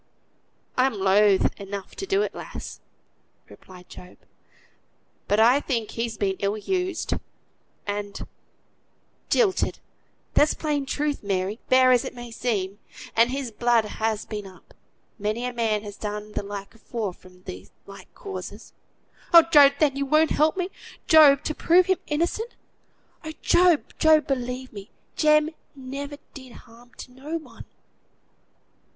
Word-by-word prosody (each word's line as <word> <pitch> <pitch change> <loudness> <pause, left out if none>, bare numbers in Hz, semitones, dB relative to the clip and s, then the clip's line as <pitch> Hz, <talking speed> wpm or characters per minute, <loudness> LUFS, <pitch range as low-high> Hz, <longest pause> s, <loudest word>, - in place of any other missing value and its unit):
"I'm 255 0 +3
loth 195 0 +3
enough 200 -1 -7
to 390 - -5
do 395 +2 +2
it, - - -4
lass," - - -8 0.7
replied 180 -1 -15
Job; 180 0 -13 1.1
"but 205 - +2
I 240 +5 +6
think 235 -7 -3
he's 230 -1 -3
been 195 -2 -1
ill 200 +2 -1
used, 365 - -2 0.7
and 205 -1 -5 1.0
jilted 400 -6 +2 0.6
(that's 295 - +4
plain 290 -3 -2
truth, 295 +1 -2
Mary, 195 +2 -2
hard 255 0 +6
as 245 - +3
it - - -7
may 240 -1 -9
seem), 205 -4 -2 0.4
and 230 +2 +5
his 265 -2 -4
blood 235 0 +2
has 220 0 -2
been 210 -2 -6
up 185 -1 -17 0.5
many 215 +4 -2
a 250 - -3
man 220 -3 0
has 205 -1 -9
done 210 0 -5
the - - -3
like 200 -1 -8
afore, 225 -3 -5
from 180 0 -19 0.4
like 195 -1 -13
causes." 395 -1 -8 0.6
"Oh, 335 - +11
God! 280 -2 +7
Then 290 -3 +3
you 280 0 -2
won't 310 +2 +3
help 310 +5 +2
me, 365 0 -2 0.4
Job, 295 -4 +7
to 310 - -2
prove 350 +4 +4
him 375 -1 +1
innocent? 345 +10 -2 0.7
Oh! 315 -1 -6
Job, 350 -3 +4 0.2
Job; 315 -1 +5
believe 255 -1 -3
me, 200 +1 -10 0.3
Jem 305 0 +3 0.2
never 280 +2 -7 0.2
did 260 -3 -11
harm 240 +1 -17
to - - -10
no 285 +6 -5
one." 315 - -12
245 Hz, 140 wpm, -24 LUFS, 205-300 Hz, 1.1 s, Oh